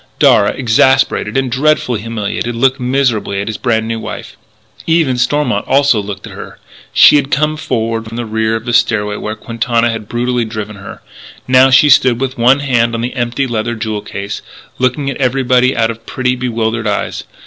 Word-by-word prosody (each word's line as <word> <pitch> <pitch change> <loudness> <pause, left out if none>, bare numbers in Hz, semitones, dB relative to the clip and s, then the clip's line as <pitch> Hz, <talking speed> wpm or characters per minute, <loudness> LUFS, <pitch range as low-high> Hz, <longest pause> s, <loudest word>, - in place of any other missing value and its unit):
Darragh, 100 - +3
exasperated 130 +2 +2
and 135 -2 -1
dreadfully 130 -4 +1
humiliated, 115 +1 -4
looked 130 +2 +1
miserably 125 -6 0
at 100 - -3
his 110 - -4
brand 110 -1 0
new 115 0 -3
wife. - - -8 0.5
Eve 165 -2 +3
and 125 -1 -1
Stormont 125 -5 0
also 135 -5 +3
looked 100 0 -7
at - - -10
her. - - -10 0.3
She - - +7
had 140 -1 -1
come 150 +3 +1
forward 115 -6 -2
from 115 +1 -8
the 120 - -3
rear 110 0 -1
of 115 0 -5
the 120 - -2
stairway 105 -3 +1
where 105 +1 -5
Quintana 115 +1 -1
had 110 -2 -7
brutally 120 +1 -1
driven 110 -2 -6
her. 100 - -11 0.4
Now 130 +1 +5
she 130 +3 +5
stood 125 -2 +4
with 135 0 -2
one 130 +4 +3
hand 120 -4 +1
on 115 - -3
the 120 +2 -3
empty 120 +2 -1
leather 120 -1 -2
jewel 110 -2 -4
case, 100 0 -6 0.4
looking 130 +2 0
at - - -6
everybody 130 -1 +1
out 115 0 +2
of 115 0 -13
pretty, 125 -1 -1
bewildered 115 -2 -2
eyes. 105 - -2
120 Hz, 190 wpm, -14 LUFS, 110-130 Hz, 0.5 s, She